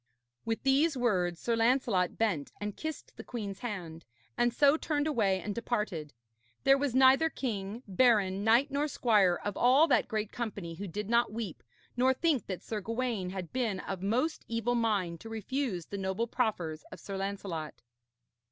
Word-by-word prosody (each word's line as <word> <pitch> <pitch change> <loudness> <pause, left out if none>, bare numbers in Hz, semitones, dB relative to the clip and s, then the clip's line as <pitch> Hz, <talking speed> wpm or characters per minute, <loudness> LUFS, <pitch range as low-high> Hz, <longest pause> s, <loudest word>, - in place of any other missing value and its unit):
With 225 0 -2
these 275 +3 +3
words 180 -8 +1
Sir 235 - 0
Lancelot 230 -6 +2
bent 195 -11 0
and 205 -1 -4
kissed 315 -1 -6
the - - -7
queen's 205 -5 -5
hand, 175 -8 -6 0.3
and 240 0 +2
so 280 +4 +5
turned 300 -2 -1
away 210 -11 +1
and 205 +2 -4
departed. 210 -10 -2 0.5
There 270 0 +6
was 275 -3 -1
neither 265 +5 +6
king, 220 -4 -4
baron, 200 -2 +3
knight 235 +6 +4
nor 285 +2 0
squire 210 -10 +3
of 205 -1 -2
all 265 +6 +5
that - - +3
great 215 -1 -2
company 205 -8 -5
who 195 +5 -6
did 205 +4 -4
not 235 0 +2
weep, 215 -6 -5 0.3
nor 260 +2 +3
think 305 -4 +1
that 185 -2 -5
Sir 215 -2 -4
Gawaine 230 -3 -2
had 185 -3 -6
been 235 -7 -1
of 190 -2 -5
most 250 +11 0
evil 230 +1 -1
mind 205 -8 0
to 225 - -9
refuse 225 - -3
the 200 - -6
noble 190 +4 -1
proffers 185 - -2
of - - -9
Sir 200 - -6
Lancelot. 195 -6 -4
220 Hz, 170 wpm, -31 LUFS, 195-250 Hz, 0.5 s, There